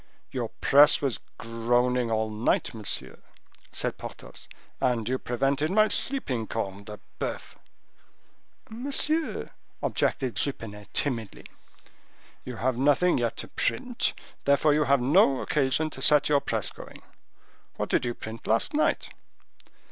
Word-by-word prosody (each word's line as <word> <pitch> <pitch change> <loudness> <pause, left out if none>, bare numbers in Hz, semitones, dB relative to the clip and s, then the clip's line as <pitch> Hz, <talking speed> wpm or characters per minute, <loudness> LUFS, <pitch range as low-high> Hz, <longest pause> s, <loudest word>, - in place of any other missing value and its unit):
"Your - - -3
press 145 +2 +6
was 135 -4 -1 0.2
groaning 120 +1 +1
all 110 -1 0
night, 110 +4 0
monsieur," 110 -3 -4 0.5
said - - -2
Porthos, - - -10 0.3
"and 120 -4 0
you 130 +1 0
prevented 135 +5 0
my 215 +3 +4
sleeping, 130 - -1
corne 100 -2 -4
de 105 0 -9 0.2
boeuf!" - - -4 1.1
"Monsieur—" 285 +7 -1 0.3
objected 130 -3 0
Jupenet, 105 -7 -4
timidly. 115 -7 -2 1.0
"You 125 - -7
have 125 +1 -1
nothing 145 +4 +3
yet 115 -1 -1
to - - -3
print: 250 -1 0 0.3
therefore 140 +2 +4
you 150 0 +2
have 140 -2 +3
no 140 0 +4
occasion 150 +2 0
to - - -9
set 150 -1 +4
your 145 -1 +4
press - - -2
going. - - -12 0.7
What - - -3
did - - +2
you 120 -1 -2
print 110 +1 -8
last 115 - +2
night?" 305 - +1
130 Hz, 130 wpm, -27 LUFS, 115-150 Hz, 1.1 s, press